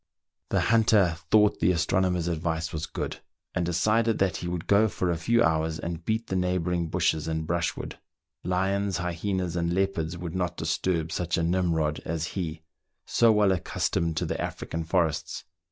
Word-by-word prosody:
The -, -, +2 dB
hunter 110 Hz, -6 st, +4 dB
thought 105 Hz, -1 st, +4 dB
the 85 Hz, -, +3 dB
astronomer's 90 Hz, 0 st, +1 dB
advice 80 Hz, -1 st, -2 dB
was 80 Hz, +1 st, -3 dB
good, -, -, -4 dB, 0.3 s
and 90 Hz, -, 0 dB
decided 110 Hz, +7 st, +2 dB
that 95 Hz, -3 st, +1 dB
he 85 Hz, -, -5 dB
would 85 Hz, -1 st, -3 dB
go 105 Hz, +2 st, +4 dB
for 90 Hz, -4 st, -1 dB
a -, -, 0 dB
few 115 Hz, +8 st, +2 dB
hours 80 Hz, -3 st, +1 dB
and 85 Hz, +1 st, -5 dB
beat 110 Hz, +4 st, -1 dB
the 95 Hz, -, -3 dB
neighbouring 90 Hz, -2 st, 0 dB
bushes 80 Hz, 0 st, 0 dB
and 80 Hz, -1 st, -2 dB
brushwood. 85 Hz, 0 st, -2 dB, 0.4 s
Lions, 95 Hz, +2 st, 0 dB
hyenas, 90 Hz, 0 st, -2 dB
and 85 Hz, -1 st, 0 dB
leopards 85 Hz, -3 st, -1 dB
would 85 Hz, -1 st, -6 dB
not 90 Hz, -2 st, -2 dB
disturb 80 Hz, +1 st, -1 dB
such 85 Hz, 0 st, -1 dB
a 85 Hz, -, 0 dB
Nimrod 85 Hz, -3 st, +1 dB
as 80 Hz, 0 st, -3 dB
he, 80 Hz, -4 st, -4 dB, 0.4 s
so 115 Hz, -1 st, +4 dB
well 105 Hz, -2 st, +4 dB
accustomed 85 Hz, -2 st, -1 dB
to -, -, 0 dB
the -, -, -3 dB
African 80 Hz, 0 st, -4 dB
forests. 80 Hz, -2 st, -1 dB
85 Hz, 170 wpm, -27 LUFS, 80-95 Hz, 0.4 s, hunter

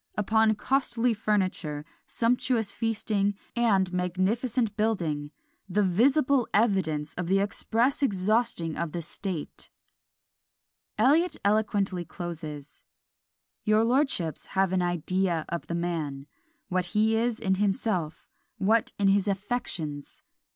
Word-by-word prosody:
Upon 220 Hz, +1 st, +3 dB
costly 245 Hz, 0 st, +1 dB
furniture, 185 Hz, -8 st, -1 dB, 0.2 s
sumptuous 230 Hz, -2 st, 0 dB
feasting, 210 Hz, -2 st, 0 dB, 0.2 s
and 195 Hz, -6 st, +2 dB
magnificent 205 Hz, +6 st, 0 dB
building, 170 Hz, -10 st, -1 dB, 0.4 s
the 205 Hz, +3 st, +2 dB
visible 255 Hz, -, +3 dB
evidence 185 Hz, -9 st, +1 dB
of 180 Hz, -1 st, -4 dB
the 190 Hz, +2 st, +3 dB
express 225 Hz, +7 st, 0 dB
exhausting 205 Hz, -, +1 dB
of 170 Hz, -2 st, -3 dB
the 170 Hz, -1 st, -3 dB
state!" 175 Hz, -1 st, -5 dB, 1.3 s
Eliot 300 Hz, +11 st, +3 dB
eloquently 200 Hz, -3 st, +1 dB
closes 160 Hz, -5 st, -7 dB, 0.8 s
Your 215 Hz, 0 st, +3 dB
lordships 235 Hz, -, 0 dB
have 190 Hz, -1 st, +3 dB
an 185 Hz, -, +2 dB
idea 175 Hz, -1 st, 0 dB
of 170 Hz, -, -4 dB
the 170 Hz, -, -3 dB
man, 160 Hz, -5 st, -3 dB, 0.4 s
what 185 Hz, -1 st, 0 dB
he 220 Hz, +1 st, +3 dB
is 230 Hz, 0 st, 0 dB
in 190 Hz, -4 st, +1 dB
himself, 195 Hz, -6 st, -1 dB, 0.3 s
what 220 Hz, +4 st, +2 dB
in 200 Hz, -1 st, +3 dB
his 200 Hz, +1 st, +2 dB
affections! 185 Hz, -8 st, -3 dB
200 Hz, 110 wpm, -27 LUFS, 175-225 Hz, 1.3 s, Upon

